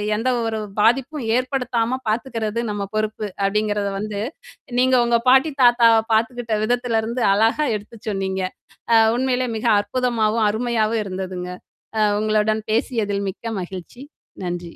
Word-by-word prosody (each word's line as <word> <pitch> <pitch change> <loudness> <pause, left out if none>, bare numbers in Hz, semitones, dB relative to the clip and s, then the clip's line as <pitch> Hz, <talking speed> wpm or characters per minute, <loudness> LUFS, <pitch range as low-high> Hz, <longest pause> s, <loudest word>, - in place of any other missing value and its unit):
எந்த 235 +4 0 0.2
ஒரு 220 -1 -2 0.2
பாதிப்பும் 265 +5 +2
ஏற்படுத்தாம 250 -1 -1
பாத்துக்கிறது 230 -1 -2
நம்ம 205 -1 -3
பொறுப்பு." 215 0 -2 0.2
அப்படிங்கிறத 205 0 0
வந்து, 210 -1 -4 0.6
நீங்க 260 0 +4
உங்க 235 0 +3
பாட்டி 265 +4 +5
தாத்தாவ 235 -2 +6
பார்த்துக்கிட்ட 230 0 0
விதத்திலருந்து 235 0 0
அழகா 225 +8 +2
எடுத்து 210 +3 -8
சொன்னீங்க. 190 -1 -2 0.5
அ - - +8 0.2
உண்மையிலே 255 -1 0
மிக 220 - -6 0.2
அற்புதமாவும், 225 -1 0
அருமையாவும் 225 -1 0
இருந்ததுங்க. 185 -2 -5 0.5
அ - - +3 0.2
உங்களுடன் 215 0 +1
பேசியதில் 215 -4 0
மிக்க 230 +3 -6
மகிழ்ச்சி. 185 +7 -8 0.4
நன்றி. 175 -1 -5
225 Hz, 120 wpm, -21 LUFS, 210-245 Hz, 0.6 s, அ